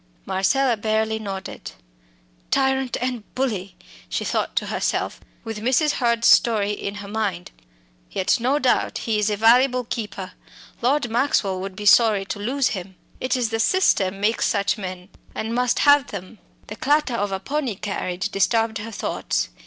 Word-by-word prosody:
Marcella 195 +7 +2
barely 220 +1 0
nodded. 195 -3 -7 0.8
"Tyrant 265 -2 +1
and 250 -2 -2
bully!" 210 -8 -2 0.3
she - - -2
thought - - -1
to - - 0
herself - - -2 0.2
with 225 -2 -5
Mrs. 265 +7 +2
Hurd's 235 -3 +1
story 210 -3 +4
in 200 0 -4
her 205 -1 -8
mind. 200 -4 -3 0.6
"Yet 195 +7 +1
no 260 +5 +1
doubt 260 -4 +1
he 220 -2 -1
is 210 0 +1
a 210 - -1
valuable 250 +3 +4
keeper; 205 -5 -5 0.5
Lord 255 0 +1
Maxwell 225 -7 +1
would 190 0 -6
be 210 +1 -7
sorry 210 -2 +5
to 205 - -5
lose 255 +5 0
him! 190 -2 -6 0.2
It 255 +1 0
is 235 -3 -1
the 225 - -1
system 200 - +2
makes 215 +3 +1
such 200 -1 +1
men 185 -3 -7 0.3
and 225 +1 -3
must 250 0 +1
have 285 -2 +5
them." 200 +2 -8 0.3
The 210 - -8
clatter 295 -2 +1
of 205 -3 -1
a 190 - -2
pony 280 -2 -2
carriage 185 -1 -3
disturbed 225 +2 +1
her 225 +2 -7
thoughts. 200 - -2
220 Hz, 160 wpm, -23 LUFS, 200-250 Hz, 0.8 s, sorry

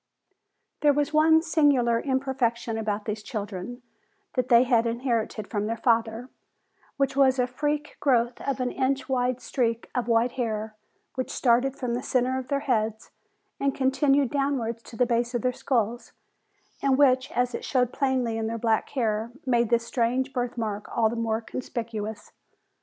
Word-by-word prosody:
"] - - -52
There 295 -1 +5
was 290 +2 0
one 320 +1 +5
singular 285 -8 +3
imperfection 260 -4 -1
about 215 -1 -2
these 215 -1 -3
children, 210 +3 -6 0.5
that 255 -1 -1
they 235 0 +7
had 235 -2 +2
inherited 230 -3 -2
from 210 0 -2
their 230 +1 -2
father, 230 0 +1 0.7
which 275 -1 0
was 270 -1 +4
a 250 - +3
freak 295 +4 -3
growth 240 -3 +1
of 275 -1 -2
an 250 -1 -1
inch 270 +1 -1
wide 255 -1 0
streak 235 -3 -2
of 245 -2 -1
white 230 +1 +3
hair 220 -4 -3 0.4
which 255 -1 -3
started 250 +2 +2
from 250 -4 -3
the 245 - -1
center 255 -1 0
of 255 - -7
their 280 0 0
heads 220 -5 -1 0.5
and 275 -1 0
continued 275 0 +2
downwards 270 -5 -1
to 230 - -12
the 250 - +3
base 240 +1 0
of 240 - -1
their 250 0 +1
skulls, 240 -2 -1 0.7
and 270 -1 +3
which 260 -2 +4
as 245 0 0
it - - -4
showed 250 -2 +1
plainly 255 -4 0
in 220 - -1
their 230 +1 -3
black 225 -1 +1
hair 220 -1 0
made 240 -3 +2
this 235 -1 +2
strange 255 +3 0
birth 245 -1 -2
mark 210 -3 -3
all 225 -2 +4
the - - -3
more 225 -1 -1
conspicuous. 220 -2 -5
245 Hz, 170 wpm, -26 LUFS, 230-265 Hz, 0.7 s, they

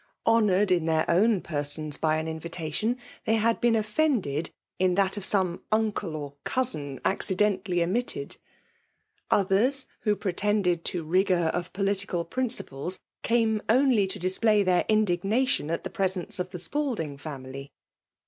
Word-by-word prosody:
Honoured 210 -4 +3
in 175 -3 +3
their 160 -1 +2
own 200 +3 +3
persons 145 -1 -2
by 155 -1 +1
an 160 - -2
invitatioin, 165 - -2 0.3
they 225 - +3
had 225 +1 +1
been 240 -1 +4
offended 210 - 0 0.3
in 185 -1 +3
that 195 0 +2
of 205 - -5
some 185 -4 +1
uncle 215 -6 0
or 145 -2 -6
cousin 150 - -2
accidentally 190 -2 +1
omitted. 245 - -2 0.9
Others, 210 +8 +2
who 210 -2 +1
pre 195 -3 -3
^ - - -23
tended 195 -5 +1
to 175 -2 -2
rigour 175 0 +2
of 175 0 -3
political 195 -3 -1
principles, 185 - -3 0.2
came' 225 -2 +2
only 240 -4 +4
to 190 - -4
display 200 +3 +2
their 180 -2 +2
indignation 215 - +2
at 165 - -2
the - - -5
presence* 190 -2 -1
of 180 0 -2
the 180 - -7
Spalding 230 - -2
family. 140 -1 -8
190 Hz, 145 wpm, -27 LUFS, 165-215 Hz, 0.9 s, been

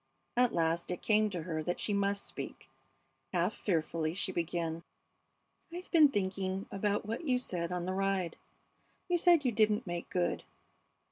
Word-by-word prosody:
At 245 0 +4
last 165 0 +1
it 180 - -4
came 215 0 +4
to 175 -5 -4
her 160 -2 -2
that 175 +3 -2
she 210 - -1
must 200 0 0
speak. - - -7 0.7
Half - - +2
fearfully 165 -3 -1
she 195 0 +1
began: 165 -1 -2 0.9
"I've 355 +2 -8
been 315 -4 +8
thinking 190 -3 -1
about 205 +1 0
what 225 +9 -4
you 255 -4 +3
said 180 -8 -3
on 180 -1 -2
the 185 - -1
ride. 195 -3 0 0.7
You 350 -1 +2
said 340 -4 +5
you 250 - +3
didn't 215 +1 +2
make 175 -1 -4
good. 180 -1 0
195 Hz, 160 wpm, -32 LUFS, 175-215 Hz, 0.9 s, been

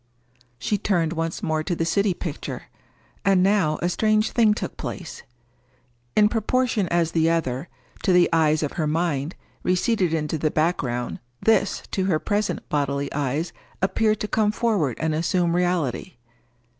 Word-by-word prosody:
She 205 - -1
turned 170 -5 +1
once 165 -1 -3
more 155 0 0
to 175 +2 -2
the 165 - -1
city 200 +2 +1
picture. 165 -4 -5 0.6
And 195 -2 +4
now 190 -6 +2
a - - +3
strange 215 +3 +2
thing 220 -3 +4
took - - -5
place. - - -6 0.9
In 210 - +6
proportion 225 -1 +1
as 170 -1 +1
the 165 -1 +2
other, 155 -3 -1 0.3
to 190 - +2
the 180 -1 +5
eyes 155 -1 +3
of 150 - -1
her 155 - +1
mind, 155 -1 -1 0.3
receded 185 0 +1
into 160 -1 -1
the 155 - +1
background, 140 -7 -1 0.2
this, 220 -3 +2
to 190 - 0
her 180 -5 +2
present 205 +5 -2
bodily 140 -1 -1
eyes, 145 +4 -1 0.3
appeared 215 +3 +1
to 210 - -1
come 210 -1 +2
forward 210 - 0
and 160 -1 0
assume 170 +2 +1
reality. 175 -2 -1
170 Hz, 155 wpm, -24 LUFS, 155-200 Hz, 0.9 s, In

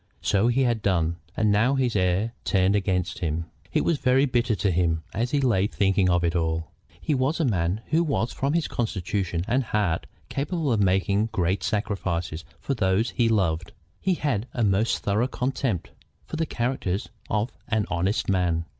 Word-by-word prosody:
So 100 +3 +3
he 125 +3 +3
had 120 -3 +1
done, 85 -4 +1 0.2
and 110 -2 +3
now 115 +7 +3
his 125 -4 0
heir 95 +4 +1
turned 95 0 +2
against 95 -3 0
him! 80 0 -2 0.3
It - - +1
was 165 -4 +1
very 130 +2 +4
bitter 120 -3 +1
to 100 -1 +1
him, 80 -2 +1
as 115 +4 0
he 145 - +1
lay 115 -8 +2
thinking 95 -2 +2
of 90 0 +2
it 85 0 +1
all. 80 -1 -1 0.3
He 155 - -1
was 135 +4 +1
a 160 - +2
man 95 -3 0
who 165 +2 +4
was 140 -7 -1
from 140 +2 -1
his 165 -2 +1
constitution 95 -5 -2
and 130 +3 +2
heart 105 -7 0 0.2
capable 145 +1 -1
of 105 - +2
making 100 +2 +2
great 95 -2 0
sacrifices 90 -6 -2 0.2
for 140 - -2
those 105 0 +1
he 115 -2 +2
loved. 90 -6 0 0.3
He 185 -1 +1
had 125 -8 -1
a 120 - +1
most 105 +2 +1
thorough 105 +5 +1
contempt 125 - -2 0.3
for - - -6
the 160 0 -1
character 120 -8 -1 0.3
of 110 +4 0 0.2
an 110 -2 +1
honest 90 +5 0
man. 90 -3 +1
105 Hz, 180 wpm, -25 LUFS, 90-125 Hz, 0.3 s, very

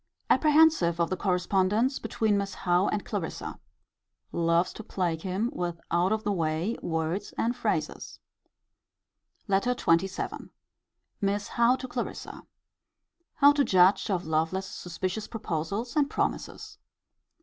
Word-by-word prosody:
Apprehensive 305 - +4
of 170 +1 +1
the - - +1
correspondence 190 +7 +1
between 220 -3 0
Miss 200 0 -2
Howe 180 +1 +2
and 210 - -2
Clarissa. 195 -7 -5 0.7
Loves 170 +1 +1
to 220 - -8
plague 175 -5 -2
him 195 +6 -1
with 175 -1 -3
out 175 +3 +2
of 220 0 0
the 205 - 0
way 165 +3 -1
words 165 +4 -2
and 235 +2 0
phrases. - - -2 1.3
LETTER 200 +5 +2
XXVII. 185 +1 0 0.7
Miss 200 +1 -1
Howe 235 +1 +3
to 260 - -6
Clarissa. 245 -1 -6 0.9
How 285 0 +7
to 290 -1 +2
judge 190 0 +4
of 180 -3 -1
Lovelace's 160 +5 -1
suspicious 185 +4 -4
proposals 200 +3 -3
and 290 -2 +2
promises. - - -3
195 Hz, 125 wpm, -28 LUFS, 175-225 Hz, 1.3 s, How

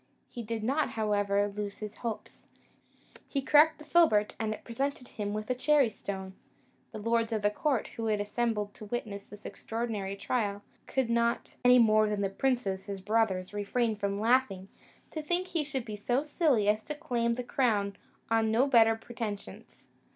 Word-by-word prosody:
He 240 - -6
did 225 -1 -4
not, 280 +7 +1
however, 205 -2 +1
lose 205 0 -5
his 210 -1 -7
hopes; 230 -3 -6 0.8
he 280 - -1
cracked 300 +3 +5
the 300 - -13
filbert, 220 -13 +4
and 220 -1 -1
it 215 - -6
presented 265 +2 -3
him 205 -1 -4
with 215 0 -4
a - - +4
cherry 270 -1 +3
stone. 190 -2 -6 0.6
The - - -7
lords 230 +1 0
of 215 -2 -1
the 205 - +3
court, 265 +1 0
who 225 -1 -4
had 210 -1 +1
assembled 210 -1 -1
to 215 - -10
witness 205 -3 -4
this 205 0 -13
extraordinary 220 -4 -4
trial, 205 -1 -2 0.2
could 265 -2 0
not, 235 0 0
any 250 0 +7
more 215 -2 +5
than 210 -1 -1
the 195 -1 0
princes 200 -5 -1
his 200 -1 -5
brothers, 200 -2 0
refrain 215 +2 0
from 200 -1 -2
laughing, 220 -5 +2 0.4
to 310 - -4
think 350 +4 -1
he 335 -4 0
should 275 -4 -4
be 215 - -5
so 245 +6 0
silly 295 - +2
as 215 +1 +3
to 300 - -4
claim 240 -7 0
the 250 - -4
crown 210 -6 +1 0.4
on 225 -1 +3
no 230 +5 +3
better 230 -5 +5
pretensions. 225 -3 -7
225 Hz, 180 wpm, -30 LUFS, 205-250 Hz, 0.8 s, any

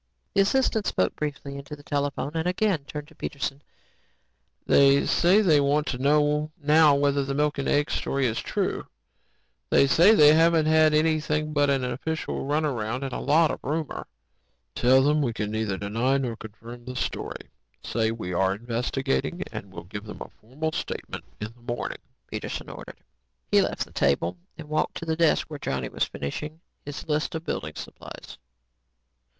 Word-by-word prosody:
The 195 - +4
assistant 220 0 +2
spoke 95 - +1
briefly 140 -2 -4
into 140 +2 -8
the 145 0 -2
phone 140 - -3
and 165 +1 -1
again 180 -5 +1
turned 150 0 -7
to - - -18
Peterson. 140 -1 -4 1.0
"They 140 0 +5
say 185 +5 +4
they 160 -8 +4
want 145 +2 +2
to 125 - -3
know 150 +2 +2
now 150 0 +5
whether 140 0 +2
the 135 0 -3
milk 150 0 +1
and 140 - -2
egg 145 +1 +2
story 135 -1 0
is 115 -2 0
true. - - -2 0.8
They - - +5
say 175 +10 +6
they 150 -3 +8
haven't 165 0 +4
had 155 -1 +5
anything 155 -1 +1
but 145 -1 +3
an 135 -2 +1
official 135 +3 -3
runaround 135 -5 -1
and 135 -2 -4
a - - -3
lot 155 +2 +3
of - - -5
rumor." 155 +2 -3 0.7
"Tell 130 +2 +4
them 150 +2 +3
we 120 -5 0
neither 105 -1 -2
deny 115 +7 0
nor 125 -4 -2
confirm 115 +2 -11
the 125 0 -6
story. - - -4 0.3
Say 110 -1 0
we 110 -5 -4
are 95 +2 +2
investigating. 130 - -2 0.2
We'll 95 - -10
give 100 +4 -8
them 105 - -9
a - - -6
formal 145 +8 -5
statement - - -5
in 105 +2 -5
the 120 0 -5
morning," - - -5 0.3
Peterson - - -5
ordered. - - -10 0.5
He - - +6
left - - -1
the - - -20
table 85 +6 +1 0.2
and 160 -2 -9
walked 155 +1 -1
to - - -6
the 160 -1 0
desk 165 -1 +3
where 150 -2 -7
Johnny 65 - -3
was - - 0
finishing 150 - -6 0.2
his 145 +3 -7
list 155 +3 -1
of 160 +1 -5
building 75 - -4
supplies. - - -10
145 Hz, 170 wpm, -26 LUFS, 120-155 Hz, 1.0 s, they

